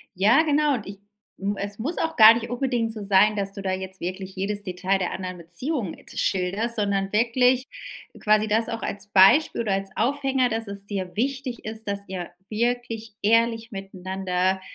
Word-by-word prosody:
Ja, 220 - +5
genau 300 -1 +2
und 220 -4 -6
ich 195 0 -9 0.4
m 200 +1 -1
es 200 +1 -5
muss 295 +10 -3
auch 325 0 -2
gar 220 0 +10
nicht 230 0 -4
unbedingt 245 -3 -1
so 215 -2 -7
sein, 200 +2 +4
dass 195 -1 -2
du 200 - -7
da 190 - -1
jetzt 190 0 -5
wirklich 185 +2 -5
jedes 200 +2 -2
Detail 185 +1 -1
der 180 - -1
anderen 185 -1 -5
Beziehung 195 - -3 0.2
schilderst, 195 +6 -1
sondern 200 -2 0
wirklich 250 +3 +3 0.5
quasi 215 0 +3
das 220 +2 +1
auch 230 -2 -4
als 200 0 -5
Beispiel 205 +10 +5
oder 215 -3 -1
als 195 0 -2
Aufhänger, 270 +1 +1
dass 225 -1 -3
es 200 0 -6
dir 190 -3 -5
wichtig 255 +1 -2
ist, 220 0 -7
dass 200 0 -1
ihr 185 -2 -5 0.2
wirklich 230 -1 -2
ehrlich 230 +2 +2
miteinander 190 -1 -2
210 Hz, 180 wpm, -24 LUFS, 195-235 Hz, 0.5 s, gar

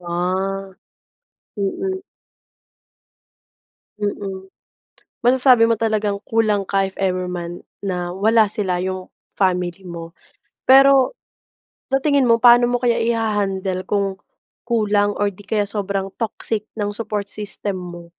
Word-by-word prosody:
Ah. 185 +3 -2 0.9
Mm. 380 - -2 2.0
Mm. 195 -2 -4 0.8
Masasabi 250 -2 +6
mo 230 - +3
talagang 215 -2 -1
kulang 215 -3 +1
ka 195 -1 +2
if 190 - -10
ever 185 -1 0
man 175 -1 -6 0.2
na 180 -3 -3
wala 220 +3 +4
sila, 195 -4 -1
'yong 185 0 -4 0.3
family 180 -1 0
mo. 170 -2 -8 0.6
Pero, 270 - +6 0.8
sa 270 - +3
tingin 285 -3 +3
mo 230 - +6
paano 240 0 +7
mo 245 - +2
kaya 240 -1 +1
iha-handle 205 -5 -1
kung 200 -2 0 0.5
kulang 205 -3 +2
or 205 0 +2
di 200 +2 -15
kaya 210 0 0
sobrang 200 -1 -2
toxic 220 -1 -2
ng 205 0 -1
support 210 -2 -2
system 205 -1 -3
mo? 175 -1 -8
205 Hz, 120 wpm, -20 LUFS, 190-225 Hz, 2.0 s, paano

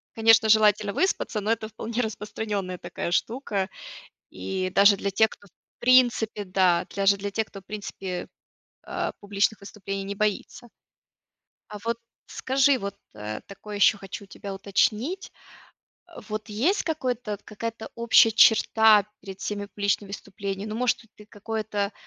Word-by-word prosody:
Конечно 225 0 +5
желательно 210 -1 +4
выспаться, 355 - 0
но 210 +2 0
это 220 -1 -2
вполне 225 +2 -3
распространенная 210 -4 -4
такая 175 0 -5
штука, 205 -2 -1 0.6
и 185 -1 -3
даже 200 +1 +7
для 200 0 -2
тех, 220 +3 +3
кто 200 - -15
в - - -49
принципе, 240 -4 +3
да, 185 -2 +2
даже 200 0 +3
для 200 +1 -4
тех 220 +2 -1
кто, 195 - -11 1.2
э, - - -3
публичных 205 +1 0
выступлений 195 -1 -6
не 200 +1 -5
боится. 215 +3 -2 1.1
А - - -5
вот 230 0 0 0.3
скажи, 270 +1 +2
вот, 200 -4 -5 0.2
э, 105 0 -6
такое 205 +1 -8
ещё 205 +1 +5
хочу 200 +1 -8
у - - -25
тебя 195 0 -8
уточнить. 220 - 0 0.8
Э, 345 -3 -12
вот 215 0 -4
есть 265 - +1
какое-то 250 - -2
какая-то 225 +1 -6
общая 235 -1 +6
черта 220 -1 +6
перед 195 0 -10
всеми 205 -1 -3
публичными 200 0 -1
выступлениями. 200 +1 -5
Ну - - -4
может 250 +1 +1
хоть 210 -1 -19
какое-то 210 -1 -3
210 Hz, 140 wpm, -26 LUFS, 200-225 Hz, 1.2 s, даже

